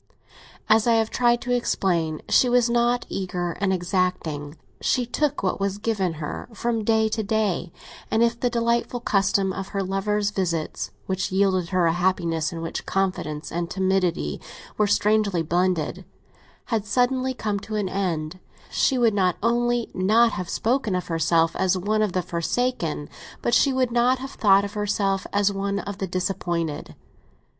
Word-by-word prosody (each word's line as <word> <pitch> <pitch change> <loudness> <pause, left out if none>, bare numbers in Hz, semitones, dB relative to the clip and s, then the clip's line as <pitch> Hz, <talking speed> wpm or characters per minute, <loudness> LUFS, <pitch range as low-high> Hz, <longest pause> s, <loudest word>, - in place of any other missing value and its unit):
As 220 +1 +4
I 235 - +5
have 225 -1 +1
tried 240 -1 +2
to 245 - -1
explain, 170 -9 0
she 250 - +4
was 245 -1 +3
not 240 +1 +2
eager 180 -2 -3
and 200 -1 +2
exacting; 175 -5 -1 0.2
she 250 - +1
took 290 +1 -1
what 185 - 0
was 195 0 -1
given 205 -5 -1
her 155 +6 -6
from 230 0 -1
day 220 0 +3
to 220 0 -1
day; 205 -5 -1 0.4
and 225 - +3
if 235 0 +1
the 245 - +1
delightful 235 +1 0
custom 195 -3 +1
of 195 0 -5
her 200 -1 -2
lover's 200 +2 0
visits, 170 -6 -2 0.2
which 190 0 -2
yielded 190 -2 +2
her 185 -2 +2
a 165 - +3
happiness 175 -2 0
in 165 -1 -6
which 165 - -5
confidence 170 -6 -2
and 170 0 -2
timidity 185 - 0 0.3
were 210 - +2
strangely 205 -4 +2
blended, 175 +1 0 0.7
had 220 -3 +1
suddenly 255 +3 +1
come 210 -4 -2
to 215 +2 -6
an 205 -2 0
end, 180 -3 -2 0.3
she 265 - +2
would 235 -3 +3
not 185 -4 +2
only 240 0 +1
not 220 +5 +4
have 180 -3 -5
spoken 230 -4 0
of 180 - -3
herself 165 0 +2
as 190 0 +2
one 215 +4 0
of 210 -4 0
the 185 - 0
forsaken, 170 -3 -2 0.4
but 235 - 0
she 275 - +4
would 255 -2 +1
not 245 +2 +3
have 265 +1 -7
thought 200 -1 +4
of 200 - -7
herself 200 -2 0
as 205 0 +2
one 200 0 -2
of 200 0 -5
the 195 - -2
disappointed. 175 -4 -3
195 Hz, 165 wpm, -24 LUFS, 180-230 Hz, 0.7 s, I